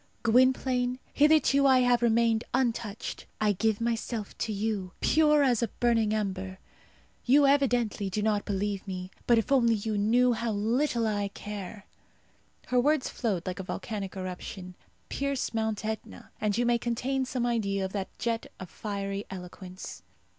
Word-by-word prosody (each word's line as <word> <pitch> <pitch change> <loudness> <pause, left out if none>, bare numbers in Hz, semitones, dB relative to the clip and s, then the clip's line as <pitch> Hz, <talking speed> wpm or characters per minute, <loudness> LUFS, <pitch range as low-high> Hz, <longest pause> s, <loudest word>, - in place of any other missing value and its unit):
Gwynplaine, 250 +1 +3 0.2
hitherto 285 -2 +4
I 260 -1 +5
have 245 -1 +3
remained 230 -1 +3
untouched; 235 -5 -2
I 215 -1 +3
give 215 +2 0
myself 230 -2 -3
to 220 - -1
you, 205 -3 -2
pure 300 -2 +4
as 245 -4 +2
a 235 - +1
burning 225 -1 +1
ember. 190 -3 -2 0.7
You 280 +3 +5
evidently 245 -8 +2
do 210 +2 -2
not 210 -1 +1
believe 200 0 -2
me; 185 -1 -5 0.2
but 235 - +5
if 225 +3 0
you 275 - +6
only 225 -3 +1
knew 240 +4 +4
how 230 -1 -2
little 235 +4 +1
I 205 -2 0
care!" 205 0 -8 0.8
Her 250 -1 +3
words 295 0 +2
flowed 200 -8 -2
like 185 +1 -4
a - - -3
volcanic 195 0 -5
eruption. 185 0 -6 0.4
Pierce 280 -3 -2
Mount 220 -2 -1
Etna, 220 0 -6
and 210 0 +1
you 240 - +2
may 240 0 +3
obtain 260 +3 -1
some 250 -1 -2
idea 200 -5 0
of 190 - -6
that 195 -2 -3
jet 230 -1 -2
of 185 - -9
fiery 200 -1 -4
eloquence. 180 - -9
220 Hz, 155 wpm, -28 LUFS, 200-245 Hz, 0.8 s, you